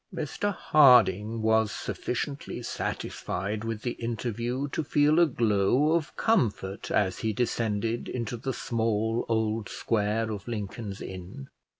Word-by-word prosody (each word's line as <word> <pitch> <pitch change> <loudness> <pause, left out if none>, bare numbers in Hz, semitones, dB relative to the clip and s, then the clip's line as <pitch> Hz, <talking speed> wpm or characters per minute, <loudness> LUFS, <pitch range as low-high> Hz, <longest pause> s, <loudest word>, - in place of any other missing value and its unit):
Mr 170 +4 -2
Harding 115 - +5
was 110 -1 +3
sufficiently 140 +3 -4
satisfied 100 +4 -3
with 115 -1 -4
the 120 - -1
interview 120 +3 -3
to 160 - -2
feel 150 +2 +3
a 170 - +6
glow 120 +3 +2
of 165 -3 -1
comfort 105 - 0
as 95 -3 +1
he 110 - 0
descended 115 0 -1
into 120 -1 -3
the 130 +3 -3
small 115 -1 0
old 110 -1 0
square 110 +1 0
of 100 0 -6
Lincoln's 105 -2 -5
Inn. 90 -7 -8
115 Hz, 125 wpm, -28 LUFS, 105-125 Hz, -, a